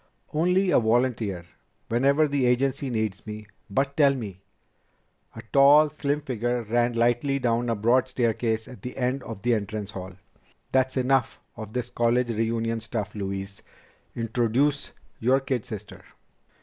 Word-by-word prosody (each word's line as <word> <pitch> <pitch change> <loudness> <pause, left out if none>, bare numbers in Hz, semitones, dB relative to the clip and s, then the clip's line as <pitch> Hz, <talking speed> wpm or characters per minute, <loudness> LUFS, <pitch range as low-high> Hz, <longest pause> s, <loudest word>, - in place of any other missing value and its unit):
"Only 180 +4 +2
a - - +5
volunteer, 110 -6 0 0.4
whenever 140 +6 +3
the 140 -3 +1
agency 130 +2 +1
needs 110 -4 -3
me. 105 0 -7 0.2
But 135 +6 0
tell 140 -3 +4
me 100 -7 -7 0.5
" - - -39
A 115 - -8
tall, 145 +2 +7
slim 150 -1 -1
figure 120 -2 -2
ran 120 +2 +1
lightly 120 +4 +1
down 120 -2 0
a 115 - +1
broad 120 +5 +2
staircase 115 -3 -1
at 125 - -12
the 125 - -7
end 130 +1 0
of 115 -4 -8
the 120 0 +3
entrance 105 -1 -3
hall. 95 -1 -7 0.6
"That's 130 0 +1
enough 130 -1 +1 0.2
of 110 0 -8
this 125 -1 -3
college 120 +1 +1
reunion 115 +1 -1
stuff, 110 -2 -4
Louise. 100 -1 -5 0.5
Introduce 120 +5 0 0.3
your 130 +4 +3
kid 130 -4 -3
sister!" 105 -2 -8
120 Hz, 150 wpm, -26 LUFS, 110-135 Hz, 0.6 s, tall